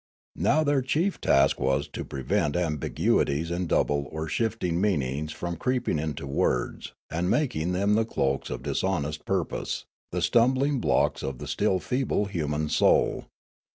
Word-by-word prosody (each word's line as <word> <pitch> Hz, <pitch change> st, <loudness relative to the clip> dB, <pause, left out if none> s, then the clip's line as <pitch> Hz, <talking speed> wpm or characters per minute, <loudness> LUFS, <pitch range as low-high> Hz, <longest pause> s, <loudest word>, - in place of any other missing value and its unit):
Now 155 Hz, +2 st, +3 dB
their 145 Hz, -2 st, +2 dB
chief 160 Hz, +9 st, 0 dB
task 70 Hz, 0 st, +3 dB
was 65 Hz, +1 st, +1 dB
to -, -, -5 dB
prevent 70 Hz, +2 st, -1 dB
ambiguities 80 Hz, -1 st, 0 dB
and 85 Hz, 0 st, -2 dB
double 70 Hz, -1 st, +1 dB
or 80 Hz, 0 st, -4 dB
shifting 90 Hz, -2 st, -1 dB
meanings 75 Hz, -6 st, 0 dB
from 85 Hz, +2 st, -4 dB
creeping 125 Hz, -7 st, 0 dB
into 75 Hz, -2 st, -4 dB
words 70 Hz, -, -1 dB, 0.2 s
and 85 Hz, +3 st, -1 dB
making 90 Hz, -, 0 dB
them 100 Hz, +3 st, +2 dB
the 110 Hz, +1 st, +3 dB
cloaks 70 Hz, -11 st, -1 dB
of -, -, -5 dB
dishonest 75 Hz, -5 st, -1 dB
purj5ose, 95 Hz, -4 st, -2 dB, 0.3 s
the -, -, -1 dB
stumbling 130 Hz, +4 st, +3 dB
blocks -, -, +1 dB
of 65 Hz, -2 st, -4 dB
the -, -, -7 dB
still 95 Hz, -, +1 dB
feeble 125 Hz, -1 st, 0 dB
human 75 Hz, -5 st, -2 dB
soul. -, -, +2 dB
85 Hz, 150 wpm, -27 LUFS, 75-115 Hz, 0.3 s, Now